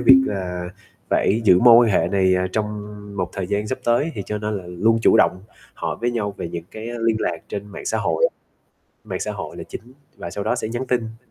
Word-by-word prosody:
việc 130 Hz, +2 st, +8 dB
là 90 Hz, -5 st, -3 dB, 0.4 s
phải 110 Hz, +4 st, +2 dB
giữ 90 Hz, -4 st, +7 dB
mối 120 Hz, -1 st, +9 dB
quan -, -, +2 dB
hệ -, -, +2 dB
này, 95 Hz, -2 st, +3 dB
à, 90 Hz, 0 st, +1 dB
trong 110 Hz, -1 st, 0 dB, 0.5 s
một 90 Hz, -2 st, -2 dB
thời 95 Hz, -2 st, -3 dB
gian 105 Hz, +2 st, -1 dB
sắp 130 Hz, +4 st, -3 dB
tới 120 Hz, +7 st, +2 dB
thì 100 Hz, -, -4 dB
cho 105 Hz, 0 st, -2 dB
nên 105 Hz, -1 st, -2 dB
là 90 Hz, -, -11 dB
luôn 105 Hz, +6 st, +2 dB
chủ -, -, +6 dB
động 95 Hz, -3 st, +3 dB, 0.3 s
hỏi -, -, -3 dB
với 120 Hz, +1 st, +1 dB
nhau 105 Hz, -4 st, -2 dB
về -, -, -4 dB
những 85 Hz, 0 st, -6 dB
cái 110 Hz, +1 st, -7 dB, 0.2 s
liên 115 Hz, -1 st, +3 dB
lạc 85 Hz, -, 0 dB
trên 100 Hz, 0 st, -5 dB
mạng 100 Hz, -, -9 dB
xã 110 Hz, -, 0 dB
hội, 85 Hz, -6 st, +2 dB, 0.8 s
mạng -, -, -4 dB
xã -, -, -2 dB
hội -, -, -7 dB
là -, -, -6 dB
chính, 125 Hz, +3 st, -9 dB, 0.2 s
và 85 Hz, -, -6 dB
sau 100 Hz, +3 st, -4 dB
đó -, -, +1 dB
sẽ 110 Hz, -, -3 dB
nhắn 120 Hz, +3 st, -3 dB
tin. 120 Hz, -1 st, -3 dB
105 Hz, 240 wpm, -22 LUFS, 95-115 Hz, 0.8 s, mối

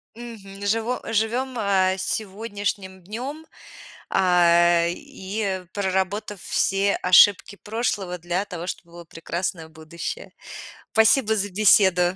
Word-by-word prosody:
Мгм. 205 Hz, -4 st, -10 dB
Живо 225 Hz, +4 st, -1 dB
живем, 240 Hz, +4 st, -1 dB
э, 190 Hz, -3 st, +2 dB
сегодняшним 200 Hz, -1 st, -4 dB
днем, 260 Hz, -, -7 dB, 0.6 s
э, 175 Hz, -2 st, +4 dB
и 190 Hz, 0 st, -5 dB
проработав 195 Hz, +1 st, -2 dB
все 195 Hz, +1 st, +1 dB
ошибки 195 Hz, +2 st, +5 dB
прошлого 205 Hz, -4 st, -3 dB
для 175 Hz, +4 st, -2 dB
того, 175 Hz, -2 st, -7 dB
чтобы 170 Hz, -2 st, -7 dB
было 175 Hz, -, -10 dB
прекрасное 165 Hz, 0 st, -5 dB
будущее. 165 Hz, -, -7 dB, 0.6 s
Спасибо 220 Hz, 0 st, +4 dB
за 205 Hz, 0 st, -1 dB
беседу! 190 Hz, -2 st, +4 dB
195 Hz, 105 wpm, -23 LUFS, 180-215 Hz, 0.6 s, ошибки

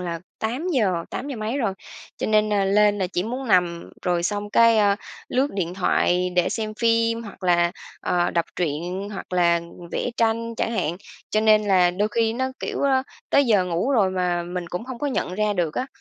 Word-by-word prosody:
là 170 Hz, -2 st, -4 dB, 0.2 s
8:00, 225 Hz, -, 0 dB
tám 275 Hz, -, -5 dB
giờ 275 Hz, -, -4 dB
mấy 220 Hz, +5 st, -2 dB
rồi, 210 Hz, -7 st, 0 dB, 0.4 s
cho -, -, -2 dB
nên, 215 Hz, 0 st, +2 dB
à, 200 Hz, -1 st, +2 dB
lên 205 Hz, +1 st, +3 dB
là 185 Hz, -, 0 dB
chỉ 180 Hz, 0 st, -2 dB
muốn 250 Hz, +4 st, -4 dB
nằm, 175 Hz, -3 st, +2 dB
rồi 175 Hz, -1 st, 0 dB
xong 205 Hz, +3 st, -2 dB
cái, 230 Hz, 0 st, +5 dB
a, 200 Hz, -1 st, +4 dB, 0.3 s
lướt 270 Hz, +3 st, +1 dB
điện 180 Hz, -3 st, -2 dB
thoại 180 Hz, -1 st, +1 dB
để 180 Hz, -, +3 dB
xem 215 Hz, -2 st, -3 dB
phim 230 Hz, 0 st, +1 dB
hoặc 205 Hz, -4 st, -11 dB
là, 175 Hz, -1 st, +3 dB, 0.3 s
ờ, 175 Hz, -1 st, +1 dB
đọc 170 Hz, -1 st, +1 dB
truyện, 175 Hz, +4 st, -2 dB
hoặc 195 Hz, -, -8 dB
là 170 Hz, -1 st, +3 dB, 0.3 s
vẽ -, -, -1 dB
tranh 230 Hz, 0 st, 0 dB
chẳng 225 Hz, -, -1 dB
hạn. 175 Hz, -7 st, -1 dB, 0.3 s
Cho 215 Hz, -, +2 dB
nên 215 Hz, -1 st, +5 dB
là 185 Hz, -3 st, +4 dB
đôi 200 Hz, +4 st, 0 dB
khi 225 Hz, +1 st, +1 dB
nó, 260 Hz, +3 st, -1 dB
kiểu, -, -, -3 dB
ơ, 265 Hz, -2 st, +3 dB, 0.3 s
tới 280 Hz, -, +5 dB
giờ 205 Hz, -5 st, +4 dB
ngủ 180 Hz, +8 st, -1 dB
rồi 210 Hz, -8 st, +3 dB
mà 180 Hz, -2 st, 0 dB
mình 175 Hz, 0 st, -5 dB
cũng 180 Hz, +5 st, -4 dB
hông 255 Hz, -2 st, -7 dB
có 290 Hz, -, -2 dB
nhận 245 Hz, -9 st, -2 dB
ra 210 Hz, +1 st, +1 dB
được 175 Hz, -5 st, -1 dB
á. 255 Hz, -, -1 dB
205 Hz, 210 wpm, -23 LUFS, 180-230 Hz, 0.4 s, cái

